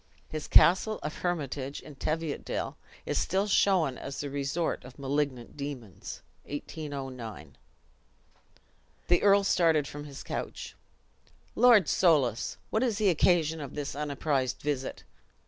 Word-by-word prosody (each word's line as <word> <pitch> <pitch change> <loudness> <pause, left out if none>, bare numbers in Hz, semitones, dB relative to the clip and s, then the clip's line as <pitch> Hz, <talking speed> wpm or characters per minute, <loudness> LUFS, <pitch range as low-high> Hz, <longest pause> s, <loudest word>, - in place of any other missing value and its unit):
His 155 -1 -5
castle 190 +5 +5
of 150 - -4
Hermitage, 145 -5 -2
in 150 - -11
Teviotdale, 155 +2 -3 0.3
is - - 0
still 190 +2 +1
shown 185 -9 +3
as 140 0 -6
the 145 -1 -4
resort 140 +4 -1
of 125 0 -12
malignant 140 -3 -2
demons. 140 - -7 0.2
(1809.) 135 -6 -6 1.5
The 175 - +5
earl 200 0 +5
started 165 -6 +3
from 145 0 -7
his 140 -2 -9
couch. - - -5 0.8
"Lord 235 -7 +6
Soulis! 140 - +2
what 220 - +1
is 235 -5 +1
the 210 -2 +3
occasion 160 -2 +3
of 140 - -7
this 145 -2 -4
unapprised 140 -3 -1
visit?" 140 -3 -2
150 Hz, 125 wpm, -29 LUFS, 140-175 Hz, 1.5 s, Lord